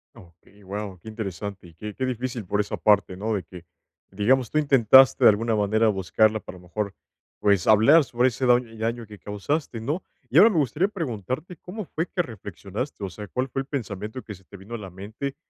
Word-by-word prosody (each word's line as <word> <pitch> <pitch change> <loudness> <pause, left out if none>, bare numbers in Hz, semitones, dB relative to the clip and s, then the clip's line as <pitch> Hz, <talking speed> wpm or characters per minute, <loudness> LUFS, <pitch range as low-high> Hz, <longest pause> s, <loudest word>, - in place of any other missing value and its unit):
Okey, 90 +4 -19
wao, 100 -1 -6
qué 100 - -16
interesante, 100 -3 -6
y 85 - -16
qué 105 +5 -7
qué 130 - -5
difícil 125 -2 -3
por 105 +3 -1
esa 105 - -1
parte, 100 -3 +3
¿no? 105 +3 -2
De 95 - -3
que, 85 +1 -12 0.5
digamos, 115 +5 +2
tú - - -1
intentaste 135 -3 +6
de - - +10
alguna 110 +2 +1
manera, 110 +2 +2
buscarla 110 +2 +2
para, 95 - -10
a - - -14
lo 90 - -17
mejor, 100 +2 -3 0.4
pues, 100 -4 +2
hablar 115 +10 +7
sobre 125 -1 +2
ese 130 +1 -2
daño, 120 -2 +2
daño 115 +1 -3
que 105 -1 -13
causaste, 115 +5 -3
¿no? 145 +11 -2 0.3
Y 145 - +5
ahora 215 +5 +8
me 195 - -1
gustaría 150 +5 +2
preguntarte, 145 - -5
¿cómo 205 +3 -7
fue 165 +2 -3
que 175 0 -1
reflexionaste? 105 - -7
O 100 - -2
sea, 105 +3 -8
¿cuál 130 +6 -2
fue 135 - -2
el 135 - -9
pensamiento 110 -3 -5
que 105 - -8
se 95 -1 -16
te 100 - -12
vino 100 +5 -11
a - - -2
la 95 -2 -8
mente 110 +9 -6
110 Hz, 215 wpm, -25 LUFS, 100-130 Hz, 0.5 s, de